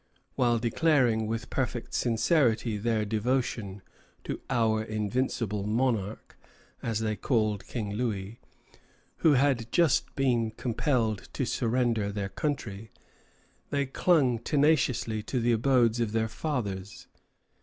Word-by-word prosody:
While 120 -2 +2
declaring 120 -2 +2
with 115 +2 -4
perfect 125 -2 -2
sincerity 120 -2 +2
their 110 0 0
devotion 110 -3 -1 0.4
to - - -5
"our 110 -4 +2
invincible 110 -1 -2
monarch," 110 -3 -1 0.5
as 115 -1 -2
they 110 -1 -1
called 110 -5 0
King 105 -4 -4
Louis, 105 -2 -3 0.8
who 160 - +4
had 130 -4 +2
just 170 -5 +2
been 120 -4 +1
compelled 115 -1 -1
to - - -1
surrender 115 -3 0
their 100 -1 -3
country, 110 -3 -4 0.8
they 140 -1 0
clung 135 -4 +2
tenaciously 130 -5 +1
to 125 +4 -2
the 120 +1 +2
abodes 120 -1 +3
of 115 -2 -1
their 110 0 +1
fathers. 105 -8 -4
115 Hz, 115 wpm, -28 LUFS, 110-130 Hz, 0.8 s, who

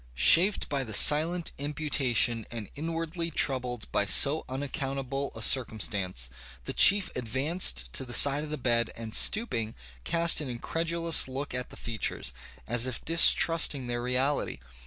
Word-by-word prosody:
"Chafed 165 - +3
by 140 -2 -3
the 110 -4 -5
silent 165 +6 +4
imputation, 135 -6 -1
and 115 -4 -8
inwardly 165 +2 -5
troubled 125 -6 -2
by 100 - 0
so 140 +10 +4
unaccountable 135 0 -5
a - - -7
circumstance, 100 - -1 0.4
the - - -6
chief 200 -1 +6
advanced 125 - 0
to - - +2
the 125 - -11
side 140 +3 +5
of 155 - -8
the 150 - -5
bed, 120 -3 0
and 115 -1 -9
stooping, 115 - +1 0.3
cast 170 - +2
an 145 - -6
incredulous 165 +6 -1
look 135 +1 -6
at 125 0 -5
the - - -14
features, 110 - -3 0.3
as 120 - +2
if 125 - -6
distrusting 165 -4 +3
their 120 0 -4
reality. 130 +4 -2
135 Hz, 145 wpm, -27 LUFS, 120-160 Hz, 0.4 s, chief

